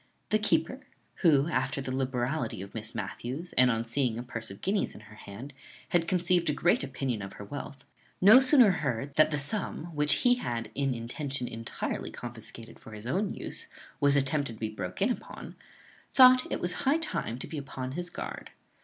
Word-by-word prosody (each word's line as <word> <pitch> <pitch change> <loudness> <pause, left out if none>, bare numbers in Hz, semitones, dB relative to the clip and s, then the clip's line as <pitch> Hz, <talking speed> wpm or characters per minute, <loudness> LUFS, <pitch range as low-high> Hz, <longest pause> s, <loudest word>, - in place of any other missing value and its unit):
The 215 - +3
keeper, 175 +5 +1 0.4
who, 150 -5 +4
after 135 -3 -1
the 130 -1 -3
liberality 125 - -2
of 100 - -11
Miss 110 0 -7
Matthews, 120 - -5
and 125 0 +5
on 115 -1 0
seeing 120 -1 0
a 120 - -4
purse 115 -3 -5
of 100 - -10
guineas 200 +1 0
in - - -11
her 105 0 -15
hand, 110 +7 -10 0.4
had 170 -1 +2
conceived 180 -2 +2
a - - +2
great 175 +1 +2
opinion 130 -4 -3
of 95 - -7
her - - -9
wealth, 140 +2 -8 0.3
no 210 +7 +9
sooner 260 -5 +6
heard 140 -5 -2
that 155 +1 +5
the 150 - -1
sum 165 +2 0
which 150 0 +5
he 245 0 +6
had 120 - -4
in 135 -2 0
intention 125 +2 -3
intirely 115 0 -4
confiscated 115 -1 -9
for 110 - -12
his 105 +1 -9
own 190 - 0
use - - -5 0.3
was 140 0 +4
attempted 140 -2 +1
to - - -17
be 110 - -2
broke 95 -4 -3
in - - +2
upon, - - -7 0.6
thought 255 -1 +7
it 175 - -1
high 275 - +1
time 305 - -3
to 130 - -5
be 155 - -5
upon 130 -2 -6
his 175 +5 -4
guard. - - -7
135 Hz, 190 wpm, -29 LUFS, 115-170 Hz, 0.6 s, no